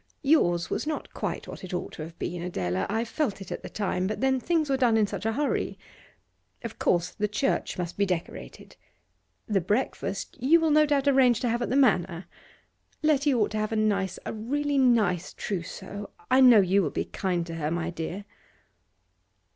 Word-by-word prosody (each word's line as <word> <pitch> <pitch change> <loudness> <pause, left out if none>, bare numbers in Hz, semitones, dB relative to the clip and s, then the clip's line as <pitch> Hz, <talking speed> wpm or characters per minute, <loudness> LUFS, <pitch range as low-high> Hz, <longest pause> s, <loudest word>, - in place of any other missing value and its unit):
'Yours 175 - +2
was - - -2
not 310 - -4
quite - - -4
what - - -9
it 185 -1 -5
ought 180 - -4
to - - -9
have 165 +2 -8
been, 175 -1 -4
Adela. 95 - -2
I 225 +3 0
felt 230 -1 -2
it 195 - -9
at - - -4
the - - -8
time, 185 -3 -1
but 215 - -3
then 265 0 +2
things 325 +2 0
were 275 - +1
done 245 -4 +3
in 215 - +4
such 215 - -4
a 225 - 0
hurry. 290 +4 -1 0.9
Of 230 -1 -7
course 175 -1 +1
the 210 -1 -1
church 245 +6 -1
must 175 -1 -4
be 200 - +4
decorated. 165 - -5 0.7
The 200 -3 +1
breakfast 205 0 -2
you 310 +7 +5
will 320 -1 +2
no 305 0 +5
doubt 285 -1 +1
arrange 260 -4 +4
to 245 - 0
have 235 +1 0
at - - -1
the - - 0
Manor. 190 -9 +2 0.8
Letty 295 -1 +3
ought 230 -5 +1
to 215 - -2
have 215 +1 -2
a - - -1
nice, 200 -4 0
a - - -4
really 280 +6 -1
nice 220 -9 +2
trousseau; 200 +2 -5 0.2
I 260 +1 +6
know 245 -5 +8
you 195 +2 +3
will - - 0
be - - -3
kind 180 -3 -2
to 165 - -7
her, 155 -2 -2
my 170 +1 -2
dear. 175 +4 -5
215 Hz, 200 wpm, -27 LUFS, 180-265 Hz, 0.9 s, know